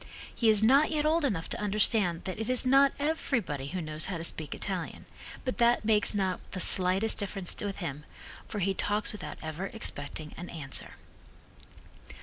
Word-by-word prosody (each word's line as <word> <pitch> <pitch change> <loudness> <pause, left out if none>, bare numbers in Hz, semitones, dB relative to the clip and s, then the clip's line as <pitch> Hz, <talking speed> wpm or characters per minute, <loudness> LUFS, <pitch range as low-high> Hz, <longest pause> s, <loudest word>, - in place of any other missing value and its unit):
He 230 - +2
is 215 -1 +5
not 275 +7 +5
yet 305 -1 0
old 320 +1 +2
enough 195 -12 -1
to - - -4
understand 205 -4 +2
that 190 +2 -5
it 220 - -3
is 255 0 +4
not 275 +2 +5
everybody 245 - -2
who 185 +5 -4
knows 155 0 -1
how 185 - -3
to 165 - -6
speak 155 -3 -2
Italian, 185 -4 -4 0.4
but 255 - -3
that 235 -1 +3
makes 215 -1 +2
not 190 -2 0
the 185 - -3
slightest 185 +4 +4
difference 195 -3 -2
with 200 -1 -4
him, 150 -5 -5 0.4
for 215 - -6
he 195 0 +1
talks 205 +2 0
without 210 - -7
ever 160 +5 -4
expecting 155 - -5
an 175 +1 -7
answer. 145 -5 -3
200 Hz, 175 wpm, -29 LUFS, 170-230 Hz, 0.4 s, is